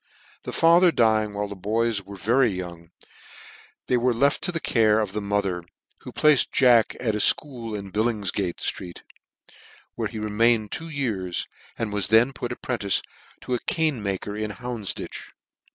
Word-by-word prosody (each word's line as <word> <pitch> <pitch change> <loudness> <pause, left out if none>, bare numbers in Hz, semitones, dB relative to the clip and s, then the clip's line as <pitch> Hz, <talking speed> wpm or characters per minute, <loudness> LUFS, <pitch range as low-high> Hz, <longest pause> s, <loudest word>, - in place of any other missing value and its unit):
The - - -4
father 170 +2 +5
dying 110 -5 +2
while 105 0 -2
the 100 - -7
boys 110 +2 0
were 100 +1 -11
very 120 +7 +2
young 85 -3 -7 1.0
they 125 - +2
were 120 0 +1
left 140 +4 +2
to - - 0
the 165 - -3
care 110 -6 +3
of 105 -3 -2
the 105 - -2
mother, 100 -3 -1 0.4
who - - -10
placed 150 -3 +3
Jack 120 -4 +4
at 115 -4 -1
a 105 - -2
fchool 115 -3 +1
in 100 -1 -8
Bimopfgare 105 -4 -1
fbreer, 85 -1 -5 1.0
where - - -2
he - - -8
remained 110 0 +2
two 165 0 -4
years, 110 - -2 0.3
and 110 -3 -3
was 100 -3 -1
then 115 +5 +4
put 120 -2 -5
apprentice 115 -5 -2 0.4
to 125 - -4
a 125 - +1
cane 160 - 0
chairmaker 100 +1 -3
in 110 0 -3
Houndfditch. 120 -4 -6
110 Hz, 165 wpm, -24 LUFS, 100-125 Hz, 1.0 s, father